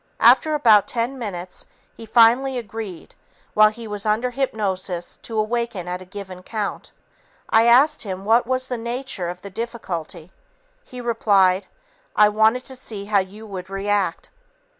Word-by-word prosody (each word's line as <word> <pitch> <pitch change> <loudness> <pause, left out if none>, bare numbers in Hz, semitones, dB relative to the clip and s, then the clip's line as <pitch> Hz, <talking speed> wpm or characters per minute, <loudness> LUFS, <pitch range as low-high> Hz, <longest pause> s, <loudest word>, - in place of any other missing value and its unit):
After 310 -1 +5
about 220 -8 +5
ten 245 +3 -2
minutes, 185 -5 -6 0.3
he 225 - -11
finally 245 +4 +4
agreed 220 -6 -7 0.4
while 215 0 +6
he 225 +1 -9
was 205 -1 -5
under 220 +4 0
hypnosis 195 -9 -2
to 225 - -7
awaken 215 -4 -2
at 180 +1 -4
a - - -10
given 190 -1 -9
count. 210 +1 -5 0.6
I 225 +1 +5
asked 260 +6 +5
him 190 -2 -5
what 230 +2 +3
was 255 0 0
the 245 -2 -3
nature 235 -6 -3
of 180 +1 -8
the 200 - -8
difficulty. 185 -7 -6 0.5
He 250 - -9
replied, 200 -5 +2 0.5
"I 210 0 +6
wanted 220 +4 +3
to 260 - -6
see 210 -5 -6
how 205 -1 +3
you 200 +4 -6
would 190 -3 -7
react." 195 -2 -1
215 Hz, 155 wpm, -22 LUFS, 190-235 Hz, 0.6 s, while